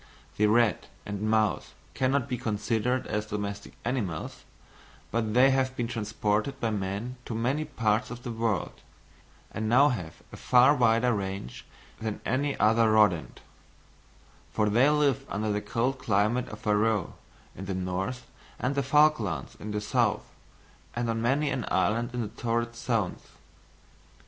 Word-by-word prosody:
The 105 - +4
rat 110 -2 +2 0.2
and 105 -1 -5
mouse 110 -1 +1 0.2
cannot 130 -1 +1
be 125 - -2
considered 115 +3 -1
as 105 0 -2
domestic 100 -1 -5
animals, 110 -10 -3 0.7
but 110 -1 -1
they 130 +2 +6
have 130 0 +1
been 120 -2 -2
transported 105 +1 -1
by 115 - 0
man 105 +5 -3
to 115 - -4
many 130 +7 0
parts 115 -6 0
of 120 0 -8
the 120 - -4
world, 110 -6 -2 0.7
and 110 0 -3
now 135 +5 +6
have 90 - -5
a - - -8
far 125 +3 +5
wider 120 -2 +3
range 95 - -5 0.3
than 110 -1 -4
any 140 +3 0
other 110 +2 +4
rodent; 105 -7 +2 1.1
for 105 -1 +1
they 125 +7 +5
live 150 -4 +2
under 105 +2 -1
the 105 0 -1
cold 125 +5 -1
climate 110 +3 +1
of 105 - -9
Faroe 105 -2 +1 0.4
in 95 - -7
the 95 -1 -3
north 95 +7 -3 0.3
and 125 - -1
of - - -4
the - - +3
Falklands 135 - +2
in 105 - -7
the 105 0 -2
south, 105 - +1 0.7
and 120 -1 -1
on 115 0 -2
many 140 +5 +1
an 125 - -2
island 115 +5 +1
in 120 - -1
the 105 - -3
torrid 115 0 0
zones. 115 -5 -1
115 Hz, 155 wpm, -28 LUFS, 105-125 Hz, 1.1 s, they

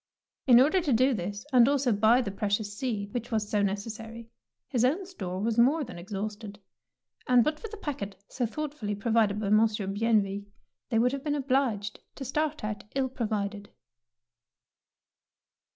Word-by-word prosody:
In 245 -2 +8
order 310 +8 +4
to 310 -5 -1
do 255 +4 +4
this, 205 +2 -4
and 245 0 +7
also 275 -3 +2
buy 220 +5 +4
the 200 - -4
precious 205 +1 -2
seed 210 -4 -3
which 240 -1 -3
was 215 -3 -1
so 210 0 +1
necessary, 225 +3 -4 0.4
his 245 -4 0
own 315 +10 +2
store 185 - -5
was 225 +3 0
more 285 +6 +4
than 230 -9 -8
exhausted, 205 +2 -6 0.7
and 250 -2 +6
but 305 +3 -1
for 450 - -6
the 430 0 -9
packet 230 - -5
so 245 -3 -2
thoughtfully 275 -6 -4
provided 215 -1 +1
by 205 -2 -2
Monsieur 215 -1 +3
Bienville 200 -1 +1 0.5
they 225 - +1
would 245 +2 +3
have 275 0 -4
been 295 -1 0
obliged 255 -7 0 0.2
to 270 - -6
start 305 +1 -1
out 210 -1 -4
ill 265 -1 +1
provided. 210 -4 -3
225 Hz, 165 wpm, -28 LUFS, 205-260 Hz, 0.7 s, In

